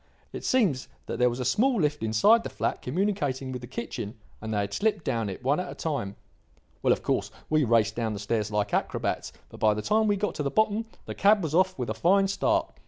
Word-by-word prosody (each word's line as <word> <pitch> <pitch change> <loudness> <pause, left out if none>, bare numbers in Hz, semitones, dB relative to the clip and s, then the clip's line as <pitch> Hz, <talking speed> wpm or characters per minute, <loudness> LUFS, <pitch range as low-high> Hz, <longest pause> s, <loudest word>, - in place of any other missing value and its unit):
It - - -6
seems 190 - +2 0.2
that - - -5
there 125 0 +5
was 120 +1 -5
a 125 - -2
small 235 - +2
lift 150 -2 0
inside 115 - +4
the - - -4
flat - - -2
communicating 145 -5 -1
with 125 -1 -5
the 120 - -8
kitchen, 115 -3 -5 0.3
and 110 0 -5
they 105 -1 +1
had 100 0 -4
slipped 205 - 0
down 115 -3 -1
it 95 - -7
one 140 +5 +2
at 180 0 -4
a - - -8
time. 140 -11 -3 0.7
"Well, - - +3
of - - +1
course, - - 0 0.2
we 155 -1 +4
raced 115 -1 +2
down 115 -2 -1
the 100 - -5
stairs 105 0 -1
like 105 -1 -1
acrobats, - - -1 0.2
but - - -12
by 105 -1 +3
the 105 - -4
time 220 +1 +2
we 205 - +3
got 210 +2 -1
to - - -4
the 140 - 0
bottom 215 +6 +1 0.2
the - - -5
cab 205 0 +4
was 155 -2 -3
off 185 +2 +3
with 125 -4 -2
a - - 0
fine 195 - +3
start. 195 - 0
135 Hz, 240 wpm, -27 LUFS, -, 0.7 s, there